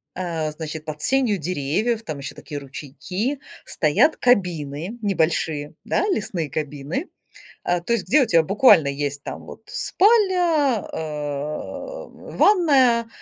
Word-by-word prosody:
э, 165 -4 -2
значит, 155 0 -7
под 150 -1 -6
сенью 255 - +2
деревьев, 185 - -1
там 155 -6 -6
еще 140 - -6
такие 145 -3 -7
ручейки, 180 - -5 0.3
стоят 315 - +2
кабины 175 - 0
небольшие, 160 -6 0
да, - - 0
лесные 190 - -2
кабины, 150 - -4 0.5
а, 175 0 +1
то 175 +7 -2
есть 230 - -1
где 300 - +5
у - - +1
тя 170 -7 +4
буквально 190 - +5
есть 145 0 -3
там - - -7
вот - - -11
спальня, 355 - +2
э, 150 - -5
ванная, 270 - +3
175 Hz, 125 wpm, -22 LUFS, 150-250 Hz, 0.5 s, где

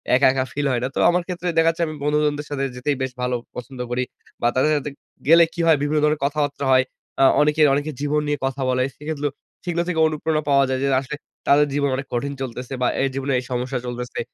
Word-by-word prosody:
একা, 130 - +4
একা 130 -1 0
ফিল 145 0 -1
হয় 125 - +1
না। 125 - +1
তো - - -1
আমার 175 +1 +2
ক্ষেত্রে 180 -1 -4
দেখাচ্ছে, 165 +1 +3
আমি 155 - -5
বন্ধু-বান্ধবদের 150 0 +1
সাথে 140 -2 -2
যেতেই 135 +3 -1
বেশ 130 - -3
ভালো 125 0 0 0.2
পছন্দ 125 +1 -8
করি 125 +1 0 0.4
বা, 120 - +3
তাদের 140 +4 +3
সাথে 145 0 -3 0.4
গেলে 165 +2 +8
কি 175 - -10
হয়? 160 - +7
বিভিন্ন 150 +1 +1
ধরনের 150 -1 +2
কথাবার্তা 145 -1 -1
হয়। 130 0 +6 0.4
আ - - +7 0.2
অনেকে 150 +1 +2
অনেকে 145 +2 -1
জীবন 150 +1 +1
নিয়ে 145 0 0
কথা 135 +1 -2
বলে। 130 0 +2
সেগুলো 150 -1 -3 0.4
সেগুলো 170 -1 0
থেকে 170 -3 -1
অনুপ্রেরণা 155 0 -1
পাওয়া 140 -1 +5
যায় 130 0 0
যে, 140 - +2
আসলে 140 +2 -6 0.3
তাদের 145 +1 +5
জীবন 140 0 +1
অনেক 135 +1 -5
কঠিন 140 +4 -1
চলতেছে 125 0 -5
বা, 125 - +3
এই 135 - +2
জীবনে 135 0 -1
এই - - -7
সমস্যা 125 +1 -2
চলতেছে। 125 0 -5
145 Hz, 220 wpm, -22 LUFS, 130-150 Hz, 0.4 s, গেলে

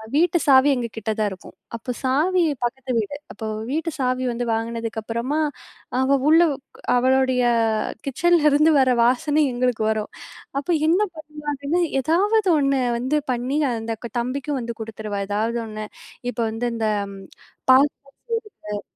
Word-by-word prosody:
வீட்டு 345 +3 +3
சாவி 270 +1 +6
எங்க 240 -2 -2
கிட்ட 220 0 -2
தான் 210 -1 +2
இருக்கும். 185 - -11 0.2
அப்போ 240 +2 -5
சாவி, 320 +8 +2 0.2
பக்கத்து 255 +2 -2
வீடு. 215 +6 -3 0.2
அப்போ 220 - -6 0.2
வீட்டு 320 +3 -1
சாவி 255 0 0
வந்து 240 +1 -3
வாங்குனதுக்கப்புறமா, 230 +4 -2 0.6
அவ 275 +1 +3
உள்ள 325 +2 +7 0.6
அவளுடைய 260 0 +3 0.6
கிச்சன்லருந்து 305 +1 +4
வர 260 -1 +4
வாசனை 295 +5 +2
எங்களுக்கு 245 -2 0
வரும். 215 -1 -3 0.5
அப்போ 290 - -3 0.2
என்ன 355 +5 +3
பண்றா 300 -1 -11
அப்படின்னா, 285 +5 -1 0.2
எதாவது 390 - +2
ஒண்ணு 275 -1 +2 0.2
வந்து 260 +5 0 0.2
பண்ணி 250 +4 -2 0.2
அந்த 225 -1 -3 0.2
தம்பிக்கும் 270 +3 -2
வந்து 235 -1 -5
குடுத்துருவா 215 -2 -5
ஏதாவது 220 +3 0
ஒண்ணு. 215 0 -6 0.5
இப்போ 245 - -4
வந்து 225 +2 -2
இந்த 225 -1 -1 0.9
பாஸ்தா 270 +3 +7 0.8
செய்றது, 210 -1 -3
255 Hz, 135 wpm, -22 LUFS, 230-295 Hz, 0.9 s, உள்ள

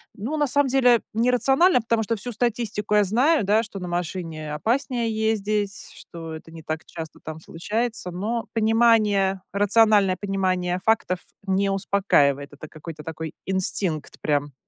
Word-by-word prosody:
ну, 235 +10 -4
на 295 -2 +1
самом 285 +1 +2
деле 250 -3 +4
не 230 +3 +2
рационально, 270 +6 +4
потому 230 0 0
что 230 +1 -1
всю 245 +4 -5
статистику 215 -2 -1
я 210 - +5
знаю, 245 - +3
да, 210 +3 +3
что 210 -3 -8
на 180 -1 -5
машине 165 -3 -4
опаснее 235 - -1
ездить, 210 -2 -1
что 165 -1 -9
это 160 +1 -10
не 165 -1 -11
так 155 +1 -4
часто 160 -2 -8
там 160 0 -7
случается, 215 +5 -3
но 215 +6 -3
понимание, 215 -4 +3
рациональное 205 -2 +4
понимание 185 -2 -1
фактов 195 -5 +1 0.3
не 195 +1 +1
успокаивает, 185 -8 +1
это 150 +2 -10
какой-то 155 0 -10
такой 160 0 -6
инстинкт 185 -4 -1
прям. 145 -2 0
200 Hz, 150 wpm, -24 LUFS, 170-230 Hz, 0.3 s, я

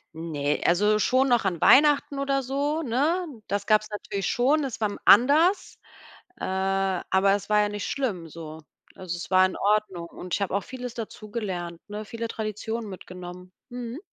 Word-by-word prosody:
Ne, 150 -3 -2
also, 210 +5 +3
schon 255 +5 +2
noch 240 -4 +3
an 175 -4 -1
Weihnachten 290 0 +5
oder 275 0 0
so, 285 +4 -1
ne? 315 +8 0 0.2
Das 200 0 -2
gab's 215 0 +3
natürlich 200 -2 -4
schon, 280 +5 +2
es 245 -4 -5
war 210 - +2
m - - -7
anders, 300 - +5 0.6
äh, - - -3
aber 190 0 +1
es 200 +1 -4
war 210 0 +5
ja 205 - +2
nicht 205 0 -4
schlimm 205 -12 -2
so. 160 0 -9 0.3
Also, 180 -2 -5
es 175 - -8
war 185 0 +6
in 185 - -1
Ordnung 200 -4 0
und 180 +1 -10
ich - - 0
habe 195 -1 -1
auch 200 - 0
vieles 250 -2 -7
dazugelernt, 205 -6 -5
ne, 210 +1 -6
viele 230 +1 -5
Traditionen 220 +1 -4
mitgenommen, 180 -1 -10 0.2
mhm. 245 +1 -6
210 Hz, 175 wpm, -26 LUFS, 185-250 Hz, 0.6 s, war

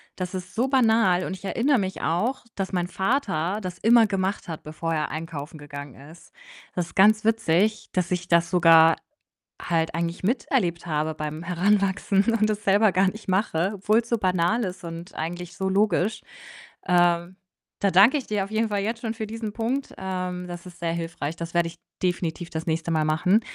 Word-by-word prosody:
Das 180 0 -5
ist 180 -1 -7
so 240 +4 +1
banal, 225 -8 +3
und 190 - -4
ich 190 - -12
erinnere 255 +7 +2
mich 190 -3 -3
auch, 195 +12 0
dass 195 0 -3
mein 175 -1 0
Vater 195 - -1
das 180 -2 -6
immer 230 0 +5
gemacht 195 0 -2
hat, 160 -2 -6
bevor 165 +2 -4
er 155 -2 -1
einkaufen 155 -1 -6
gegangen 145 -1 -10
ist. 165 - -17 0.4
Das 175 -2 -2
ist - - -17
ganz 215 +3 +5
witzig, 215 -2 +1
dass 180 -2 0
ich 180 0 -2
das 170 -1 +3
sogar 165 -2 +6 0.7
halt 165 -2 0
eigentlich 170 +2 -3
miterlebt 185 -6 0
habe 155 0 -1
beim 155 +1 -5
Heranwachsen 195 +2 +1
und 215 +1 +2
es 210 0 -2
selber 205 +1 +4
gar 185 +1 +3
nicht 215 +2 -11
mache, 190 -1 +1
obwohl's 215 +4 +1
so 235 - +2
banal 185 +3 +1
ist 185 -3 -5
und 170 0 -8
eigentlich 175 +2 -5
so 190 -1 -2
logisch. 205 +1 +1 0.6
Äh, 175 -1 +3 0.5
da 200 - +3
danke 205 +11 +6
ich 275 - -5
dir 210 -2 0
auf 195 - -8
jeden 220 +1 +1
Fall 205 -1 0
jetzt 225 +3 -2
schon 225 -2 -2
für 220 -1 -5
diesen 220 -1 -5
Punkt. 245 +5 -2
Ähm, 180 -1 -4
das 175 0 -8
ist 180 0 -12
sehr 170 -1 -1
hilfreich. 165 -2 -4
Das 170 0 -6
werde 170 -1 +2
ich 165 +1 -10 0.3
definitiv 175 -1 -2
das 160 0 -5
nächste 165 0 -1
Mal 155 -1 +1
machen. 180 +7 +3
185 Hz, 190 wpm, -25 LUFS, 170-210 Hz, 0.7 s, sogar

